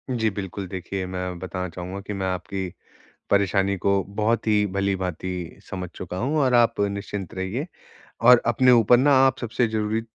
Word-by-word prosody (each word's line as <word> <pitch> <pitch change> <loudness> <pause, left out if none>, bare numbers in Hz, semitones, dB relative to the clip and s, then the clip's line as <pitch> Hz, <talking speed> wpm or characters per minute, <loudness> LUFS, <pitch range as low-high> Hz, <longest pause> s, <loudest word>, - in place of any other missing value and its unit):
जी 110 -2 +1
बिल्कुल, 95 -1 -5
देखिए, 95 +1 -4
मैं 90 -1 -4
बताना 90 0 -4
चाहूँगा 90 +3 -6
कि 105 - -6
मैं 95 -1 -2
आपकी 95 +1 -3 0.6
परेशानी 100 0 +2
को 100 +1 +1
बहुत 115 +2 +1
ही 105 -1 +3
भली-भांति 95 -3 -3
समझ 90 -1 -4
चुका 90 0 -6
हूँ 135 +10 -1
और 130 -4 +3
आप 120 -3 +3
निश्चिंत 100 -2 -3
रहिए 95 - -3 0.5
और 125 +1 +7
अपने 125 +2 +4
ऊपर 120 0 +6
ना 140 +4 +4
आप 135 - +1
सबसे 120 0 0
ज़रूरी 110 0 -1
100 Hz, 165 wpm, -24 LUFS, 95-110 Hz, 0.6 s, और